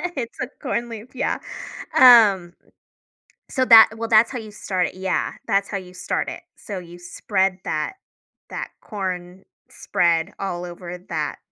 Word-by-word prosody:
It's 240 -3 -5
a 250 - -1
corn 240 -4 -2
leaf, 230 +3 -10
yeah. - - -1 0.6
Um, 210 -8 +7 1.0
so 260 -1 +1
that 225 -2 +9
well, 230 0 -4
that's 225 +1 +5
how 255 - -4
you 215 -1 -9
start 185 -3 -2
yeah, 185 0 -1
that's 200 -2 +1
how 200 - -3
you 180 -1 -8
start 185 +1 -3
it. - - -8 0.2
So 200 -3 -7
you 175 0 -11
spread 185 +1 -1
that 155 - -2 0.6
that - - -5
corn 185 -3 -5 0.3
spread 170 +2 0
all 180 -3 -4
over 175 0 -8
that 155 -3 -2
190 Hz, 150 wpm, -22 LUFS, 180-225 Hz, 1.0 s, that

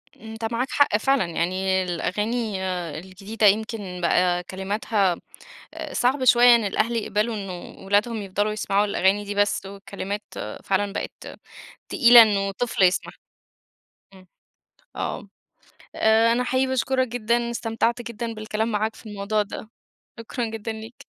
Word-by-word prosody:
أنت 225 +1 -8
معاك 250 +3 0
حق 285 -7 +3
فعلًا، 270 0 +2
يعني 185 +3 0
الأغاني 210 +3 -2 0.4
الجديدة 195 +4 -1
يمكن 205 -3 -1
بقى 180 +1 +2
كلماتها 195 0 -1 0.8
صعب 260 +2 +1
شوية، 245 0 +7
إن 230 - 0
الأهل 220 +4 0
يقبلوا 215 +1 -1
إنه 195 -2 -8
ولادهم 210 +3 +1
يفضلوا 205 +2 -1
يسمعوا 210 -1 +1
الأغاني 200 0 +1
دي 205 0 -5
بس، 205 -1 +1
والكلمات 200 +1 -6 0.4
فعلًا 200 +1 0
بقت - - -7 0.5
تقيلة 240 -3 +8
إنه 200 -2 +1
طفل 225 -1 -2
يسمعها، 185 +1 +2 1.0
امم، 185 -1 -17 0.7
آه، - - -4 0.7
آآ 220 +1 +4
أنا 245 +2 +1
حقيقي 260 +1 +1
باشكرك 260 0 0
جدًا، 235 0 -1
استمتعت 230 0 -1
جدًا 235 0 -5
بالكلام 215 +1 -3
معاك 215 +1 -1
في - - -16
الموضوع 210 +1 -1
ده، 210 +1 -7 0.5
شكرًا 235 +1 -4
جدًا 225 0 -5
ليك. 220 +2 -10
215 Hz, 130 wpm, -24 LUFS, 195-235 Hz, 1.0 s, تقيلة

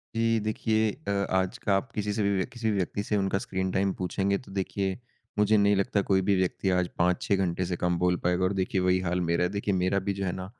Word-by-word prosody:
जी। 115 0 +2
देखिए 110 0 +1 0.2
अ, - - +1 0.2
आज 95 -1 0
का 100 - +1
आप 95 +6 -2
किसी 105 -1 -2
से 105 0 0
भी 100 - +2
व्यक्ति 95 -1 -1
किसी 115 -3 -1
व्यक्ति 100 +1 -1
से 105 - -1
उनका 95 -1 +1
स्क्रीन 95 -1 -2
टाइम 95 0 +1
पूछेंगे 100 +2 0
तो 125 - -13
देखिए 95 0 -2 0.4
मुझे 105 +1 +4
नहीं 100 0 +4
लगता 100 +1 +1
कोई 95 -1 +4
भी 100 +1 +2
व्यक्ति 95 +1 0
आज 90 -1 +2
5-6 90 +3 +2
घंटे 90 -1 0
से 90 0 -2
कम 90 0 0
बोल 90 0 +2
पाएगा 90 +1 +1
और 95 +2 +1
देखिए 95 0 0
वही 90 0 +3
हाल 90 0 -1
मेरा 85 0 +1
है। 90 - +1
देखिए 100 0 -1
मेरा 95 +2 +1
भी 100 +1 -2
जो 100 0 -3
है 90 - 0
ना, 95 - -5
95 Hz, 250 wpm, -27 LUFS, 90-100 Hz, 0.4 s, मुझे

